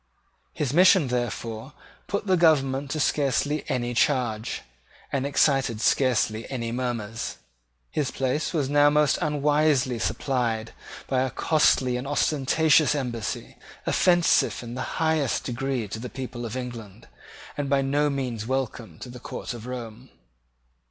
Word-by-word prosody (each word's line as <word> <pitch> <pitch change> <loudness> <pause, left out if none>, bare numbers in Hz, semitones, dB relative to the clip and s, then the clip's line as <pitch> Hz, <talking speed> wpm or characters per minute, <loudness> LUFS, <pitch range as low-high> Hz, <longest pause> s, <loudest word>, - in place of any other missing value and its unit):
His 140 -3 -2
mission, 180 -4 +5
therefore, 120 +1 -3 0.3
put 200 +1 -2
the 190 -2 +3
government 140 -5 +2
to 155 - -2
scarcely 145 +1 +1
any 120 -1 -1
charge, 120 -4 0 0.5
and 140 0 0
excited 135 -5 +2
scarcely 125 -3 +1
any 115 -4 -3
murmurs. 115 -3 -3 0.5
His 145 -4 -1
place 135 +3 -1
was 150 -6 0
now 145 +1 +5
most 150 -2 +3
unwisely 150 -4 +2
supplied 115 -4 -1 0.3
by 130 -1 0
a 130 - 0
costly 130 -4 +2
and 125 +2 -5
ostentatious 150 +2 +3
embassy, 120 -6 -4 0.3
offensive 175 -7 +3
in 120 0 -7
the 130 - -4 0.2
highest 160 -5 +1
degree 130 -2 -2
to 110 - -5
the 125 +2 -6
people 120 -2 -6
of 115 +3 -5
England, 120 -6 -8 0.5
and 145 -1 -3
by 135 0 +2
no 145 +2 +1
means 125 -6 -3
welcome 120 -9 -3
to 125 - -7
the 125 0 -9
court 125 - -6
of 120 0 -9
Rome. 125 0 -7
130 Hz, 140 wpm, -25 LUFS, 120-145 Hz, 0.5 s, mission